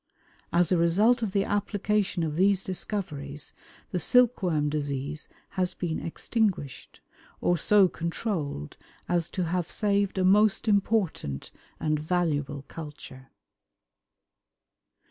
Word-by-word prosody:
As 175 0 +3
a 180 - +4
result 210 +9 +4
of 220 -4 -1
the 195 0 +2
application 205 -2 0
of 155 -2 -2
these 195 +2 +3
discoveries, 150 -7 -4 0.4
the 180 - -1
silkworm 185 -9 +3
disease 145 0 -3 0.2
has 185 -2 -1
been 170 -3 -2
extinguished, 185 - -2 0.4
or 175 - +2
so 200 +3 +5
controlled 165 - -3 0.3
as 175 -1 0
to 185 - -2
have 175 0 -1
saved 200 -2 0
a 190 - +2
most 210 +3 +4
important 200 - 0 0.3
and 155 -1 0
valuable 150 -4 -1
culture. 145 -4 -10
175 Hz, 110 wpm, -27 LUFS, 150-200 Hz, 0.4 s, so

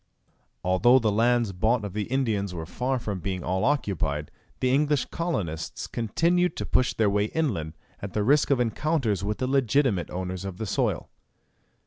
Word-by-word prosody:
Although 95 +8 +5
the 115 -4 +2
lands 115 0 +2
bought 110 +4 +1
of 100 - -6
the 105 0 -2
Indians 110 -7 -1
were 80 -1 -5
far 125 +9 -1
from 105 -5 -4
being 90 0 -3
all 95 +2 -1
occupied, 85 - 0 0.3
the 130 0 +2
English 145 -2 +2
colonists 95 - -3
continued 170 - +1
to - - -3
push 125 - +1
their 110 - +2
way 100 +1 +2
inland, 100 - -2 0.2
at 100 - -6
the 105 - 0
risk 140 +6 +3
of 140 -3 +3
encounters 120 - 0
with 105 +1 -1
the 130 - -1
legitimate 130 -6 +2
owners 90 0 -4
of 95 -2 -6
the 110 - -3
soil. 95 - -1
110 Hz, 170 wpm, -26 LUFS, 95-130 Hz, 0.3 s, Although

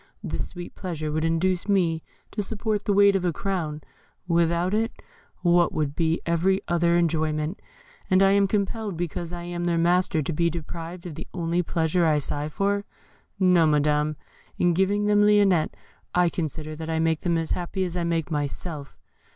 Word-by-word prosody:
This - - -3
sweet 175 -1 -9
pleasure 160 -5 -4
would 155 +1 -1
induce 175 +4 0
me 170 -5 +2 0.3
to 210 - -2
support 210 0 -2
the - - +1
weight 200 0 +5
of 190 - 0
a 175 - +2
crown; 160 -4 -3 0.4
without 170 +2 +2
it, 225 +3 -1 0.4
what 175 -1 +4
would 150 -2 -1
be 165 -1 +1
every 175 +3 +2
other 170 0 +2
enjoyment? 155 0 0 0.5
And 190 0 +5
am 200 +1 +5
I - - 0
compelled, 205 -1 -2
because 170 0 -3
I 175 -1 -6
am 175 0 -4
their 170 -1 +1
master, 170 -2 +2
to 165 - -2
be 170 +2 +2
deprived 170 +2 -7
of 175 - -6
the - - -8
only 170 0 0
pleasure 165 0 +1
I 155 -1 +3
sigh 145 +1 0
for? 200 +5 0 0.6
No, 180 -4 +5
Madam; 150 0 +2 0.4
in 175 -1 +3
giving 200 +4 +1
them 210 0 +4
Lionette 205 -5 +4 0.4
I 180 -1 +4
consider 155 -2 -4
that 160 0 -6
I 160 - 0
make 160 -1 +1
them 170 -2 +1
as 165 -1 -2
happy 180 +2 -2
as 180 -1 -3
I 175 - -1
make 165 -1 -1
myself. 145 0 -4
170 Hz, 180 wpm, -25 LUFS, 160-190 Hz, 0.6 s, weight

